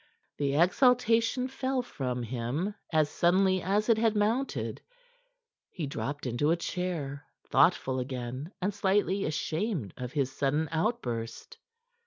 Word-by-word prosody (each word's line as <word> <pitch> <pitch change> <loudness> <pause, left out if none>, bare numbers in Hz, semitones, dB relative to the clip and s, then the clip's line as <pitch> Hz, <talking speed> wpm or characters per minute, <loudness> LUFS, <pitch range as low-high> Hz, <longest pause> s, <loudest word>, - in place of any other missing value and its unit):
The 140 -1 0
exaltation 230 - +3
fell 260 -1 -1
from 125 - -3
him 125 - -2 0.2
as 155 -2 +3
suddenly 185 +4 +3
as 205 +4 +1
it 230 -2 +4
had 225 -1 +2
mounted. 225 +6 0 0.9
He 170 - -4
dropped 140 +1 -4
into 125 +4 +1
a 170 - +3
chair, 165 -6 -3 0.2
thoughtful 130 0 +3
again 130 +4 -5
and 200 +2 -1
slightly 200 0 +1
ashamed 155 - -2
of 125 -1 -5
his 135 -3 0
sudden 145 +3 0
outburst. 125 - -2
165 Hz, 125 wpm, -29 LUFS, 135-210 Hz, 0.9 s, it